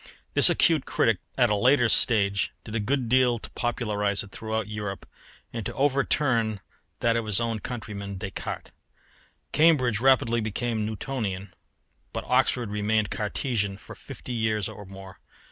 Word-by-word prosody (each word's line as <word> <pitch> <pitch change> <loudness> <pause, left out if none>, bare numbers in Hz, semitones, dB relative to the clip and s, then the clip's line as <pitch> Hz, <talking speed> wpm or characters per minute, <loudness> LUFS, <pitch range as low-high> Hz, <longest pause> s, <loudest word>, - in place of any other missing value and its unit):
This - - +9
acute 160 -5 +3
critic 110 -5 +2 0.2
at 120 -4 +3
a - - +3
later 125 +3 +4
stage 100 -4 +2
did 110 - -9
a 110 - 0
good 125 +4 -1
deal 125 0 +3
to - - -9
popularise 105 -4 -1
it 100 - -14
throughout 110 +1 -3
Europe 105 -2 -5 0.5
and 115 -2 -4
to - - -5
overturn 130 -5 +1 0.4
that 115 0 +2
of 115 -2 -1
his 105 -1 +3
own 115 -2 -1
countryman 100 -4 -6
Descartes. 100 -1 -6 0.8
Cambridge 140 -8 +3
rapidly 120 -2 +3
became 110 0 -2
Newtonian, 105 -5 -4 0.6
but - - -3
Oxford 125 -3 +1
remained 105 0 0
Cartesian 105 -2 -2
for - - -12
fifty 125 - -9
years 110 -3 0
or 105 - -9
more. 95 0 -12
110 Hz, 145 wpm, -26 LUFS, 105-125 Hz, 0.8 s, This